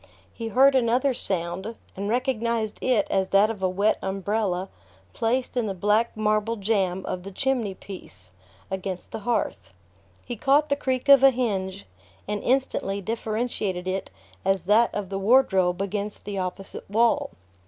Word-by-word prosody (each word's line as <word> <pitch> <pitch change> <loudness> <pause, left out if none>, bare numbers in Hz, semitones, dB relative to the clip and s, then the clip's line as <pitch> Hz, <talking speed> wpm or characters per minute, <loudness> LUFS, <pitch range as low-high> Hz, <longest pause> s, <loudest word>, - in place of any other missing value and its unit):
He 230 - -5
heard 265 +5 +5
another 255 +2 +2
sound, 190 +2 -2 0.2
and 200 +2 -3
recognized 235 -3 -1
it 245 -6 +2
as 190 -1 +1
that 200 +3 +4
of 210 -4 -8
a 185 - +2
wet 200 +4 +1
umbrella 195 -1 -1 0.5
placed 245 +3 -1
in 240 -3 0
the 195 - -3
black 210 +5 +1
marble 215 +1 +1
jamb 195 -3 0
of 180 - -3
the 195 - -8
chimney 240 -3 -1
piece, 95 - -12 0.4
against 190 -1 -4
the - - -5
hearth. 200 - -2 0.6
He 240 - -4
caught 280 +6 +3
the 280 - +3
creak 260 -2 -2
of 280 -2 +8
a 270 - +8
hinge, 195 - -2 0.4
and 210 0 -2
instantly 250 -6 0
differentiated 215 -3 -2
it 190 +1 -2 0.3
as 195 -1 +1
that 215 +5 +4
of 205 -3 -4
the 195 0 -3
wardrobe 195 -5 +3
against 205 +1 -4
the 200 -1 -3
opposite 190 +1 -6
wall. 230 +3 +2
210 Hz, 155 wpm, -25 LUFS, 190-235 Hz, 0.6 s, of